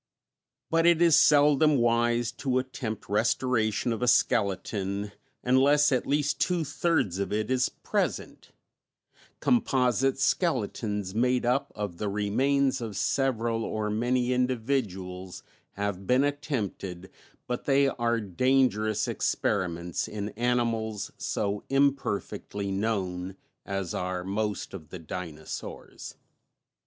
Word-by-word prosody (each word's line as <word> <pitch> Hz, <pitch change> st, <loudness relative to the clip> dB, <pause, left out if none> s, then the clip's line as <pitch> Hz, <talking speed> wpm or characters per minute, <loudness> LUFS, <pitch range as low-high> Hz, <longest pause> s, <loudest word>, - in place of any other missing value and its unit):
But 165 Hz, +1 st, +4 dB
it 170 Hz, -1 st, +5 dB
is 170 Hz, -3 st, +6 dB
seldom 150 Hz, 0 st, +5 dB
wise 120 Hz, 0 st, +2 dB
to 130 Hz, -2 st, -1 dB
attempt 125 Hz, -4 st, -4 dB
restoration 115 Hz, +1 st, +1 dB
of 115 Hz, -, -5 dB
a 125 Hz, -, +1 dB
skeleton 100 Hz, -2 st, +1 dB, 0.3 s
unless 140 Hz, +4 st, +4 dB
at 130 Hz, -, 0 dB
least 145 Hz, 0 st, 0 dB
two 175 Hz, -3 st, +1 dB
thirds 140 Hz, -, 0 dB
of 100 Hz, -, -2 dB
it 110 Hz, +3 st, -1 dB
is 130 Hz, 0 st, +2 dB
present; -, -, -3 dB, 0.9 s
composite 135 Hz, -, +2 dB
skeletons 105 Hz, -, 0 dB
made 125 Hz, +2 st, +1 dB
up 125 Hz, +3 st, +1 dB
of 100 Hz, -5 st, -5 dB
the 105 Hz, -, -1 dB
remains 130 Hz, +7 st, +1 dB
of 110 Hz, -4 st, -5 dB
several 115 Hz, -4 st, 0 dB
or 105 Hz, -1 st, -2 dB
many 125 Hz, +3 st, +1 dB
individuals, 110 Hz, -8 st, -2 dB, 0.3 s
have 100 Hz, -2 st, -3 dB
been 130 Hz, +2 st, +4 dB
attempted, 105 Hz, -, -3 dB, 0.3 s
but 125 Hz, -, -4 dB
they 140 Hz, 0 st, +4 dB
are 120 Hz, -3 st, 0 dB
dangerous 110 Hz, +1 st, +1 dB
experiments 90 Hz, -4 st, -1 dB
in 105 Hz, -1 st, -4 dB
animals 115 Hz, -2 st, -1 dB
so 100 Hz, 0 st, -2 dB
imperfectly 130 Hz, -7 st, -1 dB
known 95 Hz, -3 st, -2 dB, 0.3 s
as 95 Hz, -3 st, -3 dB
are 90 Hz, 0 st, -3 dB
most 105 Hz, +2 st, -3 dB
of 80 Hz, -6 st, -9 dB
the 90 Hz, -, -7 dB
dinosaurs. 80 Hz, -2 st, -7 dB
115 Hz, 115 wpm, -28 LUFS, 100-130 Hz, 0.9 s, is